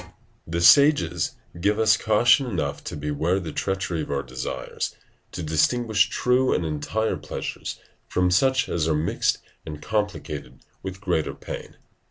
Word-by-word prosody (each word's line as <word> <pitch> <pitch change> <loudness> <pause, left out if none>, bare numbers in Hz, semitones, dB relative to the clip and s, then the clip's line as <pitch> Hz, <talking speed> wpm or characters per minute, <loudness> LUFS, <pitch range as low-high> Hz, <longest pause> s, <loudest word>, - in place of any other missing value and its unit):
] - - -36
The 85 +1 -2
sages 90 - +5 0.2
give 105 +4 +2
us 110 -1 +5
caution 120 +5 +4
enough 80 -10 -3
to - - -5
beware 75 +5 0
the 85 -4 -6
treachery 95 -2 -2
of - - -6
our 70 0 -1
desires, 65 0 -5
and - - -35
to 90 - -4
distinguish 105 +8 +2
true 125 +1 +2
and 85 - -1
entire 80 +9 -1
pleasures - - -5 0.3
from 90 0 +1
such 130 +8 +3
as 80 -2 0
are 80 - +2
mixed 75 +2 +1 0.3
and 75 -1 -7
complicated 105 +2 -3 0.2
with 95 0 -7
greater 90 -5 -1
pain. - - -8
90 Hz, 155 wpm, -24 LUFS, 80-110 Hz, 0.3 s, sages